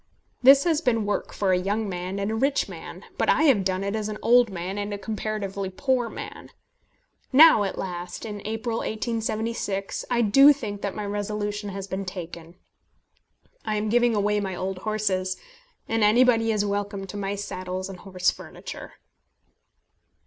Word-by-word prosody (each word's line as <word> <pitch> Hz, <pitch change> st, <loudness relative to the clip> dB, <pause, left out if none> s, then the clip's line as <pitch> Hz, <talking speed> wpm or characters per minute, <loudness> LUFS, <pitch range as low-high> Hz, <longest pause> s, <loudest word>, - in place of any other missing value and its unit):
This 270 Hz, +2 st, +8 dB
has 325 Hz, -3 st, +1 dB
been 230 Hz, -8 st, +1 dB
work 205 Hz, -, -2 dB
for 195 Hz, -2 st, 0 dB
a 180 Hz, -, +3 dB
young 205 Hz, +4 st, -1 dB
man 185 Hz, +1 st, -4 dB
and 200 Hz, +2 st, -1 dB
a -, -, -1 dB
rich 275 Hz, +5 st, +1 dB
man, -, -, -9 dB
but -, -, +2 dB
I -, -, +4 dB
have 260 Hz, -11 st, +4 dB
done 185 Hz, 0 st, -1 dB
it 200 Hz, +2 st, -2 dB
as 215 Hz, -1 st, -2 dB
an 210 Hz, -, -4 dB
old 240 Hz, 0 st, +5 dB
man 190 Hz, +1 st, -4 dB
and 205 Hz, 0 st, -3 dB
comparatively 200 Hz, -2 st, -3 dB
a -, -, -7 dB
poor 250 Hz, +3 st, 0 dB
man. -, -, -8 dB, 0.8 s
Now 300 Hz, -3 st, +8 dB
at 195 Hz, -, -4 dB
last, 180 Hz, +1 st, -5 dB
in 210 Hz, -2 st, -6 dB
April, 225 Hz, +2 st, -2 dB
1876, 220 Hz, -3 st, -2 dB
I 240 Hz, -1 st, +2 dB
do 275 Hz, +8 st, +7 dB
think 210 Hz, -7 st, -6 dB
that 200 Hz, -, -3 dB
my 210 Hz, -, -4 dB
resolution 205 Hz, 0 st, -3 dB
has 195 Hz, 0 st, -5 dB
been 195 Hz, +1 st, -4 dB
taken. 170 Hz, -2 st, -8 dB, 1.1 s
I 215 Hz, -, -1 dB
am 210 Hz, 0 st, -1 dB
giving 240 Hz, 0 st, +3 dB
away 210 Hz, 0 st, +1 dB
my 190 Hz, -2 st, -3 dB
old 190 Hz, +1 st, -4 dB
horses, 190 Hz, -3 st, -1 dB, 0.5 s
and 225 Hz, -1 st, +1 dB
anybody 225 Hz, +1 st, +4 dB
is 210 Hz, -1 st, +1 dB
welcome 200 Hz, -1 st, -2 dB
to 195 Hz, -, -9 dB
my 200 Hz, 0 st, -2 dB
saddles 185 Hz, -2 st, -5 dB
and 190 Hz, -2 st, -9 dB
horse 185 Hz, -1 st, 0 dB
furniture. -, -, -9 dB
205 Hz, 170 wpm, -25 LUFS, 195-225 Hz, 1.1 s, This